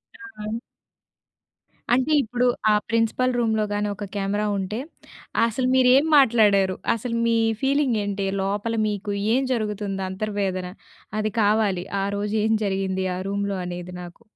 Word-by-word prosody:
ఆ! 225 - -6 1.4
అంటే 260 +5 +2
ఇప్పుడు, 245 +2 -1 0.3
ఆ - - +5 0.2
ప్రిన్సిపల్ 230 +3 +1
రూమ్‌లో 220 -2 +1
గానీ, 205 0 0
ఒక 205 +1 -6
కెమెరా 200 +1 -1
ఉంటే 195 +3 -3 0.7
అసలు 250 +3 -1
మీరేం 260 +3 +5
మాట్లాడారు? 210 -7 +4 0.2
అసలు 230 +1 -4
మీ 230 0 +3 0.2
ఫీలింగేంటి? 230 -8 0 0.2
లోపల 205 +4 -1
మీకు 205 0 -3 0.2
ఏం 260 - +3
జరుగుతుంది 205 -3 -2
అంతర్వేదన 190 -2 -2 0.5
అది 215 0 -1
కావాలి. 205 -3 +2 0.2
ఆ - - 0
రోజు 205 +1 -2
ఏం 220 - +2
జరిగింది, 190 -1 -1
ఆ - - -4
రూమ్‌లో 200 0 -2
అనేది 180 0 -6
నాకు? 175 -1 -11
210 Hz, 130 wpm, -24 LUFS, 195-230 Hz, 1.4 s, ఆ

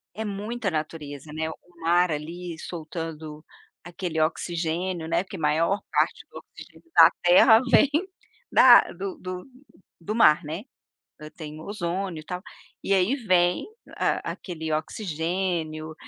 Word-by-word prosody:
é 220 - -4
muita 210 +1 -3
natureza, 150 -2 -5
né, 160 +1 -3
o - - -8 0.3
mar 175 +1 +3
ali 165 +3 -5
soltando 160 -2 -7 0.4
aquele 175 -1 -4
oxigênio, 170 +1 -2
né, 175 - +1
porque - - -9
maior 165 +5 +1
parte - - 0
do - - -9
oxigênio 335 - -15
da - - +9
terra 205 +6 +7
vem 285 - +5 0.6
da 245 -2 +9
a - - -8
do 190 +2 -6
do 185 0 -6 0.6
do 190 +6 -4
mar, 155 -10 +5
né. 160 +6 -5 0.7
Tem 155 -1 -8
o - - -10
ozônio 185 -3 -3
e - - -16
tal, 180 +1 -5 0.4
e 200 - +1
aí 195 +7 +3
vem 180 -8 +2 0.3
a - - 0
aquele 160 -4 -6
oxigênio, 160 -1 -2
170 Hz, 140 wpm, -25 LUFS, 155-190 Hz, 0.7 s, da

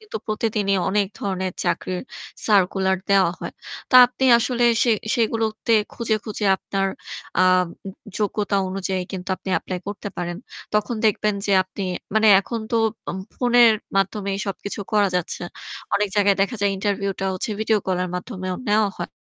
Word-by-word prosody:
কিন্তু 430 - -7
প্রতিদিনই 215 -2 0
অনেক 200 0 +2
ধরনের 190 -2 -2
চাকরির 180 -1 -1 0.4
সার্কুলার 190 -2 +3
দেয়া 195 -3 +4
হয়। - - -6 0.4
তা 255 - +7
আপনি 250 +2 -3
আসলে 245 0 0 0.2
সে 240 - +3 0.2
সেগুলোতে 225 -1 0 0.2
খুঁজে, 230 -2 -1
খুঁজে 215 0 -3
আপনার 195 0 -2 0.5
আ - - +5 0.8
যোগ্যতা 205 -1 0
অনুযায়ী 190 -1 -2
কিন্তু 185 -1 -6
আপনি - - -10
এপ্লাই 185 +2 -5
করতে 205 0 -5
পারেন। 175 0 -3 0.4
তখন 210 +3 +1
দেখবেন 210 -1 +2
যে 200 - +1
আপনি 190 +2 -8 0.3
মানে 220 0 +4
এখন 230 +3 -5
তো 235 - +1 0.3
অম 190 - -5 0.2
ফোনের 240 -2 +5 0.2
মাধ্যমেই 195 0 0
সবকিছু 200 +1 -4
করা 205 -2 +4
যাচ্ছে। 175 - -3 0.5
অনেক 210 0 +1
জায়গায় 200 -1 +4
দেখা 210 +5 +1
যায় 200 -1 +2
ইন্টারভিউটা 200 -1 -2
হচ্ছে 185 - -3
ভিডিও 220 0 +2
কল 185 -1 0
এর - - -4
মাধ্যমেও 185 -1 -5
নেওয়া 210 0 +3
হয়। - - -4
200 Hz, 155 wpm, -22 LUFS, 190-220 Hz, 0.8 s, তা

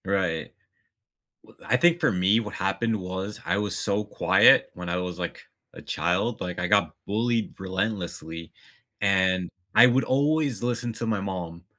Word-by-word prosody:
Right. 95 -4 -1 0.9
W - - -20
I - - +3
think 175 0 +4
for - - +2
me, 95 +4 +3
what 105 -3 -6
happened 110 +4 -1
was, 95 +3 -5
I 95 +3 0
was 105 0 -2
so 105 0 0
quiet 105 - +4
when 90 -1 -7
I 90 - -1
was, 90 -1 -4
like, 85 - -5 0.3
a - - -11
child, 95 +7 -1
like, 90 -1 -4
I 90 - -1
got 100 +2 +2
bullied 115 +2 -1
relentlessly, 95 -4 -4 0.5
and 95 -2 +2 0.3
I 120 +3 +9
would 125 +2 +2
always 140 -3 +1
listen 120 -1 -2
to 115 +1 -4
my 110 -2 0
mom. 90 -3 -5
100 Hz, 165 wpm, -26 LUFS, 90-115 Hz, 0.9 s, I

